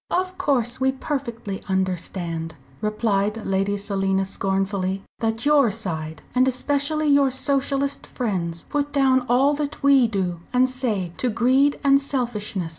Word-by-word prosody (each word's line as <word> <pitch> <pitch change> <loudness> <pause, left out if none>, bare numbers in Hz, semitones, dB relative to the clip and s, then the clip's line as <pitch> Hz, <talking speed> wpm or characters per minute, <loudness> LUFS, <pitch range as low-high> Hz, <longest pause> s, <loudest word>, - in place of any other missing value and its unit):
"Of 370 +1 -1
course 250 -3 0
we 265 0 +2
perfectly 235 -8 -4
understand," 175 -3 -2 0.3
replied 215 0 0
Lady 195 +1 0
Selina, 195 -1 0
scornfully, 195 0 -1 0.2
"that 225 +2 -2
your 290 -5 +5
side 160 -7 -5
and 255 +1 +3
especially 285 +4 0
your 280 -2 +4
Socialist 275 +1 0
friends, 175 -9 -3
put 290 0 -1
down 265 -2 +3
all 265 +4 +4
that 295 0 -4
we 275 -3 +6
do 185 -5 -2
and 250 +1 +4
say 225 -9 -2
to 250 - 0
greed 260 +5 +2
and 275 0 +5
selfishness. 220 -10 -2
235 Hz, 135 wpm, -23 LUFS, 195-275 Hz, 0.3 s, we